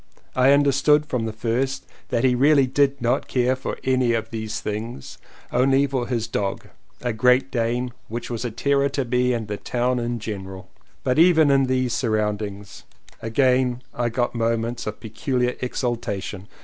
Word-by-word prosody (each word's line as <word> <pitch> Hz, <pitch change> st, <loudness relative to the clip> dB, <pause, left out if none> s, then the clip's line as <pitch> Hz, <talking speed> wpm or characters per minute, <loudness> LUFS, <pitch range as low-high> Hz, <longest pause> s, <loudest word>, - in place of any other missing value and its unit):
I 130 Hz, +1 st, +5 dB
understood 145 Hz, +1 st, +4 dB
from 125 Hz, -6 st, -2 dB
the -, -, -3 dB
first 125 Hz, +5 st, -2 dB, 0.2 s
that 120 Hz, -, 0 dB
he 130 Hz, -1 st, +4 dB
really 140 Hz, +2 st, +4 dB
did 140 Hz, +1 st, +1 dB
not 120 Hz, +3 st, +1 dB
care 125 Hz, 0 st, +1 dB
for 130 Hz, -, -5 dB
any 130 Hz, -2 st, +2 dB
of 115 Hz, -1 st, -2 dB
these 110 Hz, -1 st, -4 dB
things, 105 Hz, -, -6 dB, 0.3 s
only 135 Hz, +3 st, +3 dB
for 130 Hz, -3 st, -2 dB
his 115 Hz, -3 st, -1 dB
dog 100 Hz, -4 st, -3 dB, 0.2 s
— -, -, -35 dB
a 120 Hz, -2 st, 0 dB
Great 125 Hz, +4 st, +3 dB
Dane, 120 Hz, 0 st, -1 dB
which 115 Hz, +2 st, -5 dB
was 120 Hz, 0 st, -3 dB
a 120 Hz, -, -2 dB
terror 140 Hz, +4 st, +1 dB
to 140 Hz, -1 st, -2 dB
me 125 Hz, +1 st, +1 dB
and 115 Hz, -3 st, -2 dB
to 105 Hz, -, -3 dB
the -, -, -25 dB
town 125 Hz, +1 st, 0 dB
in 120 Hz, 0 st, -2 dB
general. 95 Hz, -4 st, -7 dB, 0.3 s
But 125 Hz, +3 st, +1 dB
even 160 Hz, -4 st, +6 dB
in 135 Hz, -1 st, +4 dB
these 130 Hz, -2 st, 0 dB
surroundings 105 Hz, -3 st, -2 dB, 0.4 s
I -, -, -5 dB
again 125 Hz, +1 st, +2 dB, 0.3 s
got 120 Hz, +1 st, -1 dB
moments 115 Hz, 0 st, -1 dB
of 105 Hz, -, -5 dB
peculiar 125 Hz, +2 st, -1 dB
exultation. 105 Hz, -6 st, -3 dB
125 Hz, 175 wpm, -23 LUFS, 115-130 Hz, 0.4 s, even